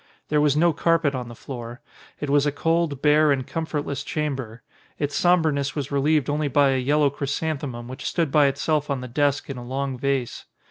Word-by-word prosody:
There 150 0 +3
was 150 -1 +3
no 170 +1 +4
carpet 165 -2 +2
on 125 -2 -4
the 120 - -9
floor. 120 -1 -8 0.4
It 145 - -3
was 145 0 +3
a - - +2
cold, 165 -1 0
bare, 150 0 +5
and 130 -2 0
comfortless 150 -4 -3
chamber. 135 -7 -4 0.3
Its 145 -1 -2
sombreness 160 -6 +2
was 145 -2 -4
relieved 140 0 +2
only 150 0 0
by 140 0 +3
a 130 - +1
yellow 145 +2 +2
chrysan 145 +2 -2
themum 120 -5 -6
which 130 +3 -8
stood 165 -5 0
by 145 -1 +5
itself 150 +2 0
on 135 -2 -1
the 125 - -6
desk 145 +3 0
in 140 - -6
a 120 - -7
long 130 +1 -3
vase. 135 -2 -2
145 Hz, 200 wpm, -24 LUFS, 135-150 Hz, 0.4 s, bare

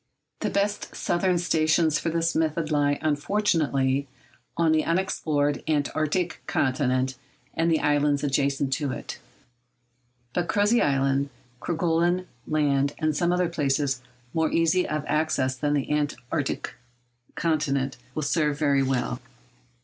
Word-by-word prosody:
The - - -1
best 205 +1 -1
southern 180 +1 +1
stations 160 -2 +2
for 165 - -2
this 165 0 0
method 160 0 0
lie 145 -1 +2
unfortunately 145 -4 +1 0.5
on 165 -1 +3
the 155 -1 +3
unexplored 150 -5 0
Antarctic 155 +3 0
continent 130 -1 0 0.3
and 165 +1 +1
the 160 - +2
islands 145 -1 +2
adjacent 140 -1 +1
to 140 0 -1
it; - - -6 1.1
but 175 -1 0
Crozet 205 +4 +3
Island, 135 0 +1 0.3
Kerguelen 175 +2 +1 0.2
Land, 145 -2 +1
and 155 -2 0
some 175 +2 +1
other 180 0 +2
places 140 -4 0 0.3
more 160 -1 +1
easy 165 +2 +2
of 150 -1 -2
access 150 -4 0
than 145 +2 0
the 140 0 -1
Antarctic 145 -1 -2 0.6
continent, 140 -4 0 0.2
will 155 - -1
serve 150 -1 +1
very 140 -2 +2
well. 125 -2 -1
150 Hz, 125 wpm, -26 LUFS, 140-165 Hz, 1.1 s, on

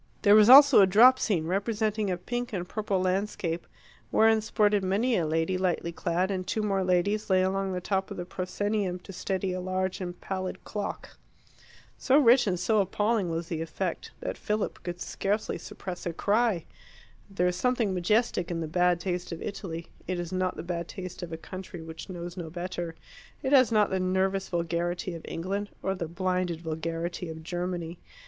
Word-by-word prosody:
There 205 -2 +7
was 215 +1 +7
also 280 -3 +10
a 195 - +6
drop 245 +7 +7
scene, 175 -8 0
representing 210 +3 0
a 180 - 0
pink 240 +6 -4
and 180 -2 -3
purple 205 -1 -1
landscape, 185 -2 -1 0.4
wherein 220 0 +4
sported 210 -2 +2
many 215 +7 +1
a 170 -5 +1
lady 165 +4 0
lightly 175 -2 0
clad, 180 +3 -1
and 185 -1 -3
two 215 +3 -1
more 195 -2 +1
ladies 190 +4 +1
lay 185 -1 +4
along 195 +1 0
the 180 -1 -3
top 190 +1 -1
of - - -7
the 175 - -4
proscenium 185 +1 -2
to 195 - -10
steady 185 0 -2
a 185 - -3
large 185 +1 -2
and 175 -1 -5
pallid 185 -1 -4
clock. 210 -1 -6 0.8
So 265 - +4
rich 250 -4 +6
and 180 -2 0
so 215 +3 +3
appalling 205 0 0
was 165 0 -3
the 160 -2 -2
effect, 165 +2 -3
that - - -4
Philip 210 0 -2
could 175 0 -5
scarcely 205 +4 -2
suppress 180 -1 -7
a 170 - -2
cry. 205 -1 +1 0.6
There 195 -2 0
is 180 0 +1
something 235 -1 +1
majestic 185 0 +1
in 170 -1 -2
the 160 - -3
bad 180 +2 +2
taste 180 0 -3
of 165 - -5
Italy; 170 -5 -6 0.2
it 180 0 -2
is 175 0 -5
not 185 0 0
the - - -6
bad 170 -1 -3
taste 185 -2 -7
of 175 -2 -6
a 160 - -4
country 185 +1 -8
which 160 +3 -9
knows 175 -1 -6
no 170 -4 -6
better; 175 0 -5 0.5
it 265 +1 0
has 255 -5 +6
not 210 -2 +3
the 190 - +1
nervous 190 +1 0
vulgarity 175 +1 -2
of 165 - -7
England, 195 +4 -3
or 190 - 0
the 180 -4 -4
blinded 180 -1 -1
vulgarity 165 +2 -3
of 160 0 -8
Germany. 175 0 -4
185 Hz, 190 wpm, -28 LUFS, 175-205 Hz, 0.8 s, also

